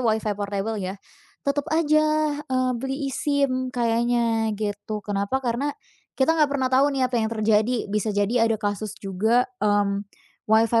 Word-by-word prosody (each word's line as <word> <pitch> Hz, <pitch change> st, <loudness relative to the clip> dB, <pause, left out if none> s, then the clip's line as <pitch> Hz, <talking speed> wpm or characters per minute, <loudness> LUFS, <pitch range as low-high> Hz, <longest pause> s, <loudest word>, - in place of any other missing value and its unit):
Wi-Fi 220 Hz, -3 st, +1 dB
portabel, 205 Hz, +1 st, -3 dB
ya. 190 Hz, +2 st, -4 dB, 0.5 s
Tetep 285 Hz, +2 st, -1 dB
aja, 310 Hz, -1 st, +2 dB
eee, 255 Hz, 0 st, +1 dB
beli 270 Hz, +1 st, -3 dB
eSIM, 275 Hz, -3 st, 0 dB
kayaknya, 235 Hz, -1 st, +1 dB
gitu. 210 Hz, 0 st, -4 dB
Kenapa? 200 Hz, +4 st, -1 dB
Karena 245 Hz, +4 st, 0 dB, 0.5 s
kita 270 Hz, +4 st, +3 dB
nggak 310 Hz, -3 st, +3 dB
pernah 265 Hz, -2 st, -1 dB
tahu 270 Hz, +2 st, +5 dB
nih, 260 Hz, -, +2 dB
apa -, -, +2 dB
yang 220 Hz, -, 0 dB
terjadi. 220 Hz, 0 st, +1 dB
Bisa 210 Hz, +1 st, 0 dB
jadi 215 Hz, +3 st, +2 dB
ada 225 Hz, -, +1 dB
kasus 210 Hz, 0 st, -3 dB
juga, 220 Hz, +6 st, +1 dB, 0.2 s
mmm, 205 Hz, -1 st, +2 dB, 0.5 s
Wi-Fi 225 Hz, +1 st, +4 dB
230 Hz, 150 wpm, -24 LUFS, 210-265 Hz, 0.5 s, tahu